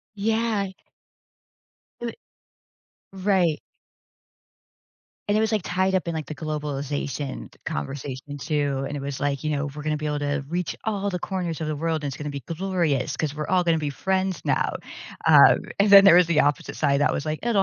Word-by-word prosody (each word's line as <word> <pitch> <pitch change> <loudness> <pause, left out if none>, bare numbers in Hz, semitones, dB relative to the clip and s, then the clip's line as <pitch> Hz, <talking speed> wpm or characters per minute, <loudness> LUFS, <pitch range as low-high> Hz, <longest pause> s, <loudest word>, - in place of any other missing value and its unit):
Yeah. 215 -2 0 1.3
I 235 -1 -4 1.0
right. 185 -5 +1 1.7
And 205 - +3
it - - +3
was, 220 0 +1
like, 210 -4 +1
tied 185 +3 0
up 180 -2 0
in, 165 - -2
like, 155 -2 -4
the 155 - -6
globalization 145 -2 -4
conversation 135 - -5
too, 145 -2 -1
and 145 - -4
it - - -4
was 140 -1 -5
like, 140 0 -1
you 155 - 0
know, 140 +1 -1
"We're 150 0 -8
gonna 155 0 0
be 155 0 -4
able 150 0 -1
to 145 -1 -2
reach 175 0 -2
all 200 -2 -1
the 180 -2 -3
corners 175 -4 -3
of 155 - -2
the 155 - -2
world, 160 0 -1
and 140 - -2
it's 135 - -7
gonna 150 -1 -5
be 140 -1 -5
glorious 165 -5 -1
'cause 150 -2 -2
we're 150 0 -4
all 185 -1 +3
gonna 165 -2 +2
be 150 -2 -2
friends 190 +4 -1
now." - - +1 0.5
Um, - - +8 0.2
and 200 0 +4
then 200 0 +10
there 175 -3 +8
was 180 -2 +6
the 170 -3 +3
opposite 145 0 0
side 140 -1 +2
that - - +3
was 140 - -2
like, 155 0 -2
"It'll 225 -5 +2
155 Hz, 195 wpm, -24 LUFS, 145-190 Hz, 1.7 s, then